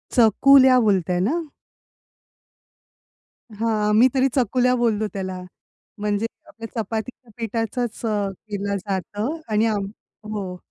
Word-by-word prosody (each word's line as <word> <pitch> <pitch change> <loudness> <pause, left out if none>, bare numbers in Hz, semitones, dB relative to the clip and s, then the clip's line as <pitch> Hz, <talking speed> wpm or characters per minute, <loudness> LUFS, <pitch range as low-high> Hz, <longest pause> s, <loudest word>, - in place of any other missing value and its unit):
चकुल्या 255 +3 +6
बोलताय 185 -6 +1
ना? 335 +7 0 2.1
हां, 215 0 0
आम्ही 220 +4 +6
तरी 265 0 +3
चकुल्या 250 0 +2
बोलतो 220 -3 +1
त्याला. 185 -2 -4 0.6
म्हणजे 205 +1 -1 0.2
आपल्या 225 +1 -9
चपातीच्या 225 +3 -6
पिठाचचं 230 +1 -3 0.2
अ, - - -3
केला 200 0 -4
जातं 205 - -3
आणि 215 +1 +3
आम 210 -3 0 0.5
हो. 190 -3 -4
220 Hz, 105 wpm, -22 LUFS, 205-245 Hz, 2.1 s, चकुल्या